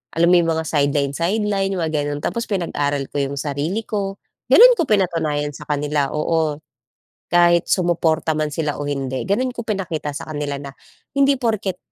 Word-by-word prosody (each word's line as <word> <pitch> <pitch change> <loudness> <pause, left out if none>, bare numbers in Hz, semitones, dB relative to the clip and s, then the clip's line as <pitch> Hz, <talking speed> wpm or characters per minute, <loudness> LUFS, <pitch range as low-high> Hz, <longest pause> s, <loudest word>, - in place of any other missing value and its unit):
alam 170 +1 +3
mo - - +6
yung 165 -1 +1
mga 160 - -1
sideline-sideline, 170 +8 0
yung 180 - -2
mga 160 - -1
ganon. 145 0 -3
Tapos, 235 0 -2
pinag-aral 145 -7 -1
ko - - -4
yung 140 0 -2
sarili 150 +9 -2
ko. 200 -2 -3 0.3
Ganon - - +9
ko 325 - +1
pinatunayan 160 -7 0
sa 150 - -11
kanila! 145 -1 0
Oo, 155 0 0 0.7
kahit 175 -1 +4
sumuporta 165 -3 +1
man 155 0 0
sila 150 -1 -2
o 145 - -3
hindi. 135 -2 -3
Ganon 250 +6 +1
ko 235 -1 -6
pinakita 175 -8 -3
sa - - -7
kanila 145 -1 -3
na, 140 -1 -8 0.5
hindi 275 0 +4
porket 220 -7 -1
165 Hz, 170 wpm, -20 LUFS, 145-195 Hz, 0.7 s, Ganon